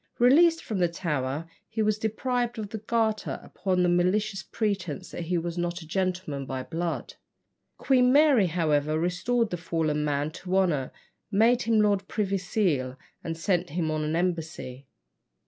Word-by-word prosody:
Released 325 +7 +5
from 215 -5 -3
the 175 - +4
Tower, 150 -3 -3 0.2
he 220 0 -1
was 215 0 +1
deprived 240 +2 -1
of 210 -2 -4
the 220 - -5
garter 220 0 -1
upon 185 -2 -1
the - - +3
malicious 190 +3 +1
pretence 190 - -3
that 175 - -5
he 175 +1 0
was 170 +1 -3
not 175 0 -2
a - - -14
gentleman 180 -6 -2
by 130 -1 -3
blood. 170 +2 -3 0.6
Queen 250 -2 +3
Mary, 280 -8 +5
however, 155 -3 +1
restored 210 +7 0
the 175 - -2
fallen 160 -3 -1
man 145 0 -1
to 185 +3 -2
honour, 160 -9 +1 0.4
made 225 +4 +4
him 225 -1 +2
Lord 200 -2 +1
Privy 195 -2 -1
Seal, 155 -10 0 0.3
and 165 -1 -4
sent 175 0 0
him 160 0 -1
on 155 0 -1
an 155 +1 -1
embassy. 160 -7 -3
180 Hz, 165 wpm, -27 LUFS, 160-215 Hz, 0.6 s, Released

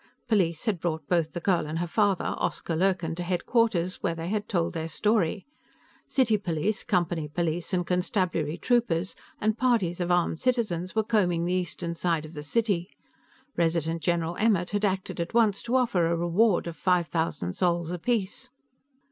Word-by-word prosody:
Police 185 -7 +1
had 210 -6 0
brought 160 -3 -3
both 170 -3 +1
the 175 - -3
girl 175 -3 +1
and 155 +2 -3
her 175 - -1
father, 200 +1 +1
Oscar 165 - -2
Lurkin, 180 -2 +1
to - - -3
headquarters, 185 +1 0
where 165 - 0
they 165 +1 -4
had 210 0 -2
told 170 -3 0
their 160 -1 -3
story. 200 +1 0 0.6
City 230 -6 +2
police, 195 +2 -1
Company 175 -5 0
police 165 +2 -2
and 180 -2 0
constabulary 180 -3 0
troopers 205 -8 +1 0.2
and 215 +1 0
parties 220 -9 +1
of 175 -1 -1
armed 175 -2 +1
citizens 210 -8 0
were 220 - +3
combing 180 -7 +1
the 180 - 0
eastern 175 -1 -2
side 165 -2 -1
of 155 - -11
the 150 - -6
city; 195 +2 0 0.7
Resident 165 -1 0
General 170 0 0
Emmert 200 -5 +2
had 205 0 -1
acted 190 -2 -2
at 170 +6 -3
once 215 -4 +3
to 240 +2 -2
offer 230 -10 +2
a 170 0 +1
reward 175 +4 +2
of 170 -1 -5
five 180 -1 +2
thousand 160 - -2
sols 170 - 0
apiece.... 210 +6 -2
175 Hz, 175 wpm, -27 LUFS, 165-205 Hz, 0.7 s, were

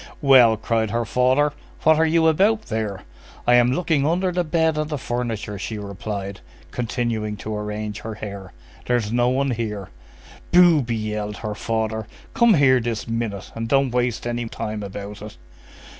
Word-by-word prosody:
"Well!" 125 -5 +7
cried 110 0 0
her 115 +2 -1
father, 130 +6 +2 0.3
"what 160 -1 +5
are 160 - +4
you 165 0 +3
about 205 +7 +3
there?" 110 - -3 0.4
"I 120 - +4
am 120 0 +5
looking 155 0 +1
under 180 +5 +1
the 180 0 0
bed 160 -1 +1
and 155 0 -2
the 150 - -2
furniture," 115 -5 -3
she 110 +2 -4
replied, 100 -1 -5 0.3
continuing 115 -3 -2
to 110 +1 -5
arrange 105 0 -4
her 110 0 -6
hair; 100 -3 -8 0.4
"there's 120 -4 0
no 120 0 +3
one 135 +1 +1
here." 105 -5 -4 0.6
"Booby!" 165 -9 +5
yelled 105 -1 -3
her 105 - -2
father. 110 0 -2 0.3
"Come 235 -3 +5
here 130 -4 +5
this 115 -2 -3
minute! 115 -4 -3
And 115 0 -4
don't 135 -1 +3
waste 120 -2 0
any 120 0 -2
time 105 -1 -4
about 100 +1 -7
it!" 105 0 -9
115 Hz, 165 wpm, -22 LUFS, 105-140 Hz, 0.6 s, Well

